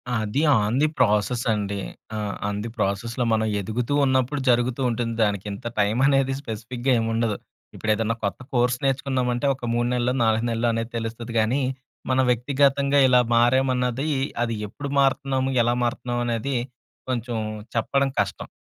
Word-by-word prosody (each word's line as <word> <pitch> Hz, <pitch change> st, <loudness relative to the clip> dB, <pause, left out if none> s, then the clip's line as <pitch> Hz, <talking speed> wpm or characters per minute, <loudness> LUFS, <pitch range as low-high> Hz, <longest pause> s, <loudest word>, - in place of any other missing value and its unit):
అది 110 Hz, +6 st, 0 dB, 0.2 s
on 105 Hz, +4 st, 0 dB
the 155 Hz, -, +5 dB
process 110 Hz, +1 st, +2 dB
అండి. 100 Hz, -1 st, -1 dB, 0.4 s
ఆ -, -, -2 dB, 0.3 s
ఆన్ 100 Hz, 0 st, -2 dB
ది 115 Hz, -, -4 dB
ప్రాసెస్‌లో, 110 Hz, +5 st, -1 dB
మనం 110 Hz, 0 st, +1 dB
ఎదుగుతూ 115 Hz, +7 st, -2 dB
ఉన్నప్పుడు 130 Hz, +2 st, +1 dB
జరుగుతూ 120 Hz, +2 st, +2 dB
ఉంటుంది. 115 Hz, 0 st, -2 dB
దానికి 100 Hz, -1 st, -1 dB
ఇంత 100 Hz, +4 st, -6 dB
టైం 105 Hz, +3 st, +2 dB
అనేది 135 Hz, -1 st, +2 dB
స్పెసిఫిక్‌గా 120 Hz, +2 st, -3 dB
ఏముండదు. 115 Hz, -1 st, 0 dB, 0.4 s
ఇప్పుడు 110 Hz, -, -1 dB
ఏదైనా 115 Hz, +1 st, -1 dB
కొత్త 100 Hz, -, -2 dB
కోర్స్ 120 Hz, 0 st, +2 dB
నేర్చుకున్నామంటే 130 Hz, -2 st, 0 dB
ఒక 120 Hz, -3 st, -5 dB
3 120 Hz, 0 st, +1 dB
నెల్లో, 125 Hz, +1 st, +1 dB
4 110 Hz, +1 st, +2 dB
నెల్లో 115 Hz, +1 st, 0 dB
అనేది 115 Hz, +1 st, -3 dB
తెలుస్తది 115 Hz, +1 st, -5 dB
గానీ, 120 Hz, +6 st, +1 dB, 0.5 s
మనం 130 Hz, 0 st, +3 dB
వ్యక్తిగతంగా 140 Hz, +3 st, +2 dB
ఇలా 125 Hz, -1 st, +5 dB
మారామన్నది, 125 Hz, +3 st, +2 dB, 0.3 s
అది 115 Hz, -1 st, -2 dB
ఎప్పుడు 145 Hz, +5 st, -6 dB
మారతన్నాము 135 Hz, -1 st, +1 dB
ఎలా 120 Hz, +1 st, +1 dB
మారతన్నాం 120 Hz, 0 st, -2 dB
అనేది 120 Hz, +4 st, -1 dB, 0.5 s
కొంచెం 120 Hz, -2 st, -2 dB, 0.4 s
చెప్పడం 140 Hz, +4 st, +1 dB
కష్టం. -, -, -2 dB
120 Hz, 150 wpm, -24 LUFS, 115-130 Hz, 0.5 s, ది